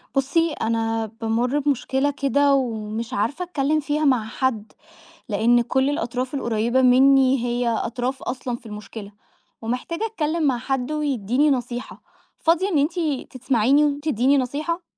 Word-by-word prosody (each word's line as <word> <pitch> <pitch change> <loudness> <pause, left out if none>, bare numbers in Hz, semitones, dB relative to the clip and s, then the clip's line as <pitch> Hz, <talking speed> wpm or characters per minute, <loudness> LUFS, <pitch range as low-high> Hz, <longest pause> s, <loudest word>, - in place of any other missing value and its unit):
بُصي، 315 +4 +1
أنا 225 -2 -1 0.2
بامُرّ 240 +5 0
بمشكلة 275 0 0
كده 285 0 +2
ومش 230 -2 -3
عارفة 255 - -1
أتكلَّم 305 -3 0
فيها 300 +1 -1
مع 255 -5 +3
حد، 225 -3 -2 0.6
لأن 230 +3 +3
كل 265 +3 +1
الأطراف 255 -4 -3
القريبة 235 0 +1
مِنِّي 260 0 +5
هي 240 0 -1
أطراف 245 +3 -2
أصلًا 250 -1 -3
في 240 - -24
المشكلة، 210 -1 -9 0.5
ومحتاجة 250 - -3
أتكلَّم 335 -7 -2
مع 265 -4 +2
حد 265 +2 -2
ويدِّيني 280 -2 +1
نصيحة. 245 -1 -4 0.4
فاضِية 340 +4 +2
إن 340 - +1
أنتِ 310 +5 0 0.4
تسمعِيني 260 +3 +3
وتدِّيني 285 -2 +1
نصيحة؟ 300 +7 -2
260 Hz, 130 wpm, -22 LUFS, 235-290 Hz, 0.6 s, مِنِّي